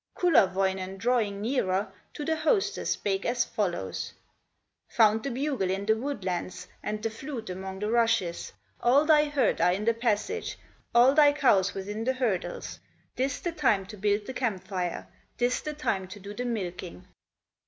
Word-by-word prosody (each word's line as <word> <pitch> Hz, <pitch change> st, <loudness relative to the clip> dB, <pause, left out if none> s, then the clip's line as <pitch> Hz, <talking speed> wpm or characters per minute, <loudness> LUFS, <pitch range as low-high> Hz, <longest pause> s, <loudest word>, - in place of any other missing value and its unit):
Kullerwoinen, 190 Hz, -, +2 dB
drawing 210 Hz, -2 st, 0 dB
nearer, 200 Hz, -5 st, 0 dB, 0.2 s
To 295 Hz, -, -4 dB
the 320 Hz, +1 st, +1 dB
hostess 390 Hz, +5 st, +1 dB
spake 195 Hz, -1 st, -1 dB
as 240 Hz, 0 st, +1 dB
follows: 175 Hz, -, -3 dB, 0.7 s
"Found 220 Hz, -1 st, +4 dB
the 275 Hz, -, -3 dB
bugle 265 Hz, -6 st, -1 dB
in 195 Hz, +1 st, -1 dB
the 220 Hz, +1 st, +3 dB
woodlands, 185 Hz, -8 st, -4 dB
And 210 Hz, 0 st, -4 dB
the 225 Hz, -, -1 dB
flute 230 Hz, -3 st, -6 dB
among 190 Hz, +1 st, -6 dB
the 210 Hz, +2 st, -2 dB
rushes; 230 Hz, -7 st, +1 dB, 0.3 s
All 270 Hz, +5 st, +4 dB
thy 305 Hz, -1 st, +5 dB
herd 290 Hz, -2 st, +1 dB
are 180 Hz, -, +4 dB
in 200 Hz, +3 st, -3 dB
the 230 Hz, -, +4 dB
passage, 235 Hz, -, -1 dB, 0.4 s
All 245 Hz, +3 st, +7 dB
thy 290 Hz, -1 st, +6 dB
cows 200 Hz, -10 st, +3 dB
within 205 Hz, +3 st, -4 dB
the 260 Hz, +3 st, +1 dB
hurdles, 235 Hz, -8 st, -2 dB, 0.4 s
This 265 Hz, +2 st, -1 dB
the 345 Hz, -, -2 dB
time 245 Hz, -12 st, +2 dB
to 205 Hz, -, -10 dB
build 205 Hz, +1 st, 0 dB
the 260 Hz, -, -6 dB
camp 205 Hz, -8 st, -2 dB
fire, 180 Hz, -3 st, -3 dB, 0.3 s
This 245 Hz, +1 st, +1 dB
the 305 Hz, -, -4 dB
time 200 Hz, -11 st, -2 dB
to 195 Hz, +3 st, -10 dB
do 200 Hz, +1 st, -8 dB
the 245 Hz, +4 st, -4 dB
milking!" 185 Hz, -5 st, -5 dB
215 Hz, 165 wpm, -28 LUFS, 190-260 Hz, 0.7 s, All